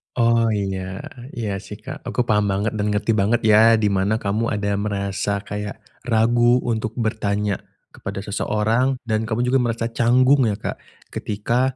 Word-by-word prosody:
Oh, 115 -1 +3
iya, 95 -2 -3 0.3
iya, 105 -4 -3
sih, 105 - -9
Kak. 135 +8 -9
Aku 125 - 0
paham 105 -3 +2
banget 100 +2 0
dan 105 0 0
ngerti 105 +2 +1
banget 105 +4 +2
ya, 110 +1 +6
di 105 -2 +1
mana 100 +2 +1
kamu 110 +1 -1
ada 100 0 -1
merasa 100 0 -2
kayak 105 +1 -6 0.2
ragu 120 +2 +3
untuk 110 -1 -2
bertanya 105 -3 -1 0.3
kepada 100 - -6
seseorang 110 +5 0
dan 110 -1 -1
kamu 110 +3 0
juga 135 - +4
merasa 115 -1 -1
canggung, 130 +2 +4
ya, 105 - 0
Kak. 105 - -5 0.3
Ketika 120 +5 -1
110 Hz, 160 wpm, -22 LUFS, 100-115 Hz, 0.3 s, ya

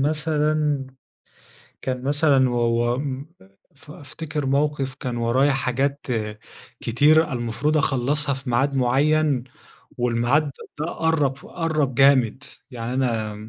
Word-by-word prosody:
مثلًا، 150 -1 0 1.0
كان 130 -1 -3
مثلًا 140 -2 +3
و 120 - -2 0.4
و - - -3
م 140 0 -4 0.5
ف 145 +1 -17
أفتكر 150 0 -6
موقف 140 -1 0
كان 125 -3 -5
ورايا 125 +5 +2
حاجات 135 +2 -1 0.7
كتيرة 150 +7 +3
المفروض 125 +5 -1
أخلّصها 140 0 +1
في 135 -1 -6
ميعاد 135 +4 +1
معين، 135 +1 +2 0.5
والميعاد 125 +5 +1 0.3
ده 155 - -2
قرّب 160 -5 0
قرّب 155 -6 -1
جامد، 135 -1 +3 0.3
يعني 120 0 -5
أنا 115 -5 -1
135 Hz, 110 wpm, -23 LUFS, 125-150 Hz, 1.0 s, مثلًا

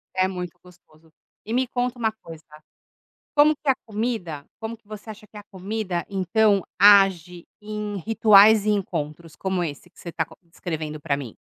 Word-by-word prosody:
É 185 0 +2
muito 180 -2 -6
gostoso. 165 -3 -21 0.3
E 220 - -4
me 255 +1 +1
conta 245 0 -2
uma 225 -2 0
coisa: 165 -1 -11 0.9
como 300 +1 +5
que 295 - -7
a 270 - +5
comida 210 -9 -3 0.2
como 225 +1 -5
que 225 - -40
você 215 +1 -9
acha 215 0 -11
que 210 - -17
a 210 - -8
comida, 190 -2 -4
então, 200 +1 +2 0.2
age 190 -4 +5 0.2
em 210 -1 -5
rituais 215 +1 +6
e 215 - +2
encontros, 165 -5 -3
como 190 -2 -2
esse 165 +2 -6
que - - -27
você 175 - -9
está 160 -1 -2
con - - -18
descrevendo 160 -3 -6
pra 140 -1 -1
mim? 130 -6 -8
195 Hz, 180 wpm, -23 LUFS, 170-215 Hz, 0.9 s, rituais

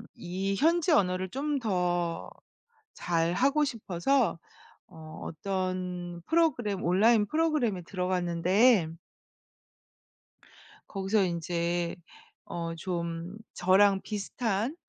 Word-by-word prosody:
이 190 +3 -3
현지 335 - +2
언어를 185 - +2
좀 285 +4 -2
더 175 -6 -1 0.7
잘하고 180 - +1
싶어서 230 - 0 0.5
어 155 -1 -11
어떤 180 0 -4
프로그램, 250 - +1
온라인 210 +5 +4
프로그램에 295 - 0
들어갔는데 180 +3 +2 2.0
거기서 195 +1 +1
인제 170 0 -1 0.5
어 165 -1 -4
좀 170 +1 -4 0.2
저랑 195 +2 +4
비슷한 215 +4 -2
185 Hz, 185 characters per minute, -29 LUFS, 175-225 Hz, 2.0 s, 온라인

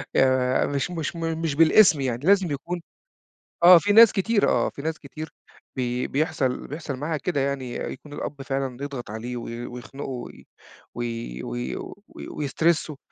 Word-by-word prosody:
يا 130 -1 +3
مش 140 +5 -2
مش 165 -1 -3
م 165 -1 -2
مش 160 -4 -1
بالإسم 165 0 +6
يعني. 130 +1 -2
لازم 190 -3 +4
يكون 170 +5 -4 0.8
آه. 175 0 +10
في 205 +4 +1
ناس 225 0 +9
كتيرة 205 +1 +2
آه، - - +2
في 140 - -9
ناس 160 +1 -2
كتير 155 +2 -9 0.4
بي 125 -1 -1
بيحصل 140 -3 -1
بيحصل 150 -2 -5
معاها 155 +4 -2
كده 145 +1 -1
يعني. 135 -2 -2
أ - - -3
يكون 145 +3 -10
الأب 145 -1 -5
فعلًا 135 -2 -3
يضغط 135 -6 -6
عليه 120 +3 -5
وي 120 0 -6
ويخنقُه 125 +3 -8
وي 125 -2 -8 0.5
وي 115 - -4
وي - - -4 0.3
وي - - -10
ويسترسُّه. 155 +2 0
140 Hz, 165 wpm, -25 LUFS, 125-165 Hz, 0.8 s, آه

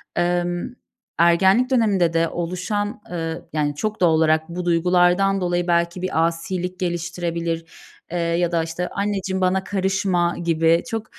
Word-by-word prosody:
emm, 175 +4 -1 0.5
ergenlik 190 +8 +4
döneminde 200 -9 +2
de 165 0 +2
oluşan, 195 +6 -3
eee, 165 -2 -3
yani, 145 -2 0
çok 215 +7 -3
doğal 175 -2 +5
olarak 160 0 +2
bu 175 +1 -5
duygulardan 180 +3 +3
dolayı 175 0 0
belki 170 +1 +1
bir 165 -3 +1
asilik 180 +2 -4
geliştirebilir, 170 -2 -3 0.5
eee, 175 - -2
ya 170 0 0
da 165 -1 +1
işte 165 +2 -4
"Anneciğim 195 -2 -2
bana 185 +1 +1
karışma." 190 -3 0
gibi 165 0 +2
çok 225 -1 -3
175 Hz, 140 wpm, -22 LUFS, 170-190 Hz, 0.5 s, doğal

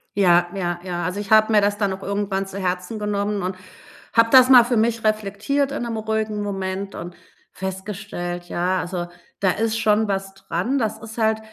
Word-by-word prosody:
Ja, 175 -3 +4
ja, 175 -2 -2
ja. 175 -2 -3
Also, 185 +4 -3
ich 205 - -7
habe 215 0 +5
mir 210 - +6
das 205 0 +1
dann 200 -2 +1
auch 190 +1 -7
irgendwann 200 -1 -2
zu 195 +1 -7
Herzen 180 +3 -2
genommen 205 -1 -1
und 185 +1 -3 0.6
habe 230 0 +4
das 255 -1 +8
mal 245 -3 +9
für 240 -1 0
mich 225 +1 +1
reflektiert 215 +7 0
in 285 - -3
'nem 230 -1 -3
ruhigen 220 -1 -2
Moment 195 0 -4
und 175 +1 -7 0.4
festgestellt: 190 -2 -5
„Ja, 180 +2 0
also, 175 -1 -4 0.3
da 190 -2 +3
ist 225 +1 -1
schon 215 -1 +2
was 195 0 -3
dran.“ 195 +7 -2
Das 220 -2 -1
ist 225 +1 -10
halt 220 -1 +2
200 Hz, 195 wpm, -22 LUFS, 190-220 Hz, 0.6 s, mal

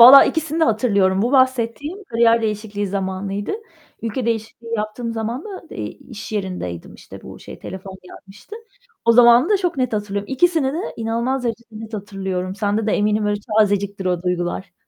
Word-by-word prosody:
Valla 260 +4 +11
ikisini 320 0 -1
de - - +6
hatırlıyorum. 200 -5 +2
Bu 245 +4 0
bahsettiğim 260 - +1
kariyer 230 -4 +3
değişikliği 210 -1 -2
zamanıydı. 195 - -3 0.5
Ülke 230 +2 -2
değişikliği 230 +1 -3
yaptığım 215 +2 -3
zaman 230 +5 -3
da, 400 -3 -9
eee, - - -4
iş 225 -3 -9
yerindeydim, 180 - -4
işte, - - -12
bu - - -10
şey, - - -11
telefon 190 0 -8
gelmişti. 195 - -12 0.5
O 230 - +6
zamanımı 240 - +7
da 415 - +5
çok 355 -5 -1
net 255 -3 0
hatırlıyorum. 205 +2 -3
İkisini 300 -1 +2
de 320 - -3 0.2
inanılmaz 235 +3 -1
derecede 235 0 -3
net 225 0 -7
hatırlıyorum. 190 -2 -4
Sende 210 +1 0
de - - +1
eminim 210 0 +2
öyle 205 0 0 0.2
tazeciktir 200 -2 +1
o 180 -1 0
duygular. 180 +1 -2
220 Hz, 165 wpm, -21 LUFS, 200-245 Hz, 0.5 s, Valla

